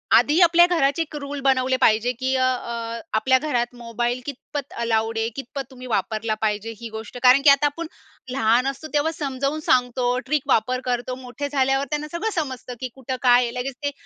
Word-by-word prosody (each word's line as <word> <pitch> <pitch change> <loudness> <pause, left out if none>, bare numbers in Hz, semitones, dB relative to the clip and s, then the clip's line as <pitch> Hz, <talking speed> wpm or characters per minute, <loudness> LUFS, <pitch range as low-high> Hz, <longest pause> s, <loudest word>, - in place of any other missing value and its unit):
आधी 300 +4 +4
आपल्या 345 0 +7
घराचे 330 -3 +1
1 315 -1 -5
रूल 285 0 -5
बनवले 260 -1 +2
पाहिजे 225 +2 +4
की 260 +1 0
अ, 260 - +2
अ, 235 -2 -2 0.2
आपल्या 260 +4 +4
घरात 245 -5 -1
मोबाईल 240 +2 -2
कितपत 285 0 -6
अलाउड 225 -1 0
आहे? 225 0 0
कितपत 270 0 -6
तुम्ही 255 0 -10
वापरला 220 +1 -1
पाहिजे? 215 +1 -1
ही 235 - -7
गोष्ट. 220 +2 -8
कारण 255 +2 +7
की 290 - +6
आता 280 +1 +5
आपण 310 +3 -2 0.4
लहान 245 0 +2
असतो, 275 +3 -4
तेव्हा 295 +2 +2
समजावून 280 -1 -2
सांगतो. 245 0 +2 0.2
ट्रिक 295 +2 +1
वापर 255 0 +2
करतो. 250 0 -2
मोठे 260 +3 -6
झाल्यावर 270 0 +1
त्यांना 300 0 -2
सगळं 375 +6 -2
समजतं 260 -5 -4
की 255 - -3
कुठं 260 -1 -4
काय, 245 -1 +5
लगेच 250 +2 -4
ते 285 - 0
255 Hz, 190 wpm, -23 LUFS, 240-285 Hz, 0.4 s, आपल्या